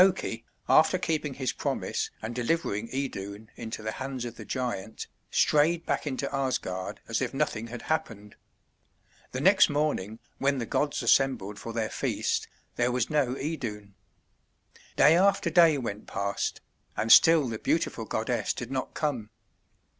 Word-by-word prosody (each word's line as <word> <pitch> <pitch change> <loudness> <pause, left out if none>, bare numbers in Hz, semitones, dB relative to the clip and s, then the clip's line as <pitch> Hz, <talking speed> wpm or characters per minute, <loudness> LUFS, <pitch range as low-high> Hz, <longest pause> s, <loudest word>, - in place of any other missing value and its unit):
Loki, 180 -11 0 0.2
after 160 +4 +5
keeping 155 -6 -2
his 130 -3 -2
promise - - -2
and 110 +2 -4
delivering 115 -4 -1
Idun 110 -5 -5
into 110 -2 -6
the 110 - -2
hands 130 0 -5
of 120 - -6
the - - -9
giant, 120 -5 -4 0.2
strayed 165 +3 +3
back - - -1
into 140 0 -2
Asgard 130 -9 -2
as - - -1
if - - -2
nothing 110 +2 -1
had 120 0 -8
happened. 115 -10 -3 1.0
The - - -3
next - - +6
morning, 145 -9 -1 0.2
when 140 0 +2
the 120 - -2
gods 145 +5 -1
assembled 105 -7 +2
for 115 - -6
their 115 -1 -2
feast, - - -1 0.3
there 120 +1 +2
was 125 +1 -1
no 140 -4 +1
Idun. 110 -10 -5 1.0
Day 150 +4 +6
after 190 -1 +3
day 165 -3 +6
went 110 -5 -5
past, 100 0 -2 0.4
and 110 - +1
still 160 -4 +7
the 110 -2 -4
beautiful - - -1
goddess - - -1
did 120 +2 -6
not 130 -1 -3
come. 130 -9 -2
125 Hz, 150 wpm, -28 LUFS, 110-150 Hz, 1.0 s, still